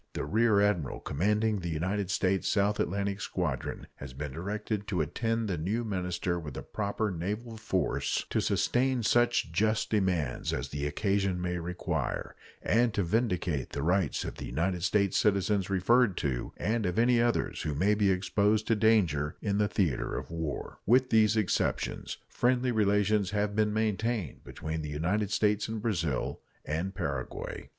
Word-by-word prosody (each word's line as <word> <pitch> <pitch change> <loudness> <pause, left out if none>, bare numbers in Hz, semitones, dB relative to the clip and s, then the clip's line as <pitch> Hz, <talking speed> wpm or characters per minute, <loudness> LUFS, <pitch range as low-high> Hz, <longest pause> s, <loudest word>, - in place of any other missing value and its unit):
The - - -3
rear 110 -1 +3
admiral 95 -10 +1
commanding 105 +6 0
the 85 -2 -4
United 90 +5 -1
States 95 0 +1
South 105 +1 +2
Atlantic 100 +2 -1
Squadron 75 -11 -3
has 70 -2 -8
been 70 +2 -5
directed 100 - -3
to 95 -5 -1
attend 115 +9 -1
the 90 -5 -2
new 105 +9 -1
minister 90 -4 -2
with 75 -5 -7
a - - -5
proper 105 0 -2
naval 105 +7 -4
force 105 -4 -1
to - - +2
sustain 130 -1 +1
such 120 -6 +2
just 110 +5 +1
demands 90 - 0
as - - -3
the 75 0 -2
occasion 95 +3 0
may 90 0 -2
require, 90 +1 -3 0.3
and 115 -1 +2
to 100 - +1
vindicate 90 - -1
the 70 - -2
rights 90 -2 +1
of - - -6
the - - -6
United 85 +7 -1
States 100 +2 +2
citizens 100 -1 +2
referred 100 +2 +3
to 65 -4 -2
and 110 -1 0
of 90 - -2
any 120 +1 +4
others 120 0 0
who 75 -2 -2
may 95 +8 +3
be 105 -1 +2
exposed 105 +3 +2
to 115 - +2
danger 90 -10 +2
in 100 -1 -1
the 105 - +3
theater 90 - 0
of - - -6
war. 80 -3 -4
With 125 +3 +4
these 110 -1 +4
exceptions, 105 -4 -1
friendly 125 0 +1
relations 105 -2 +2
have 105 0 -1
been 105 0 +2
maintained 110 - -1
between 80 0 -5
the 75 - -5
United 90 +8 0
States 105 0 +1
and 110 0 -3
Brazil 85 - -1 0.2
and 85 +5 -2
Paraguay. 70 -3 -4
100 Hz, 165 wpm, -30 LUFS, 85-110 Hz, 0.3 s, any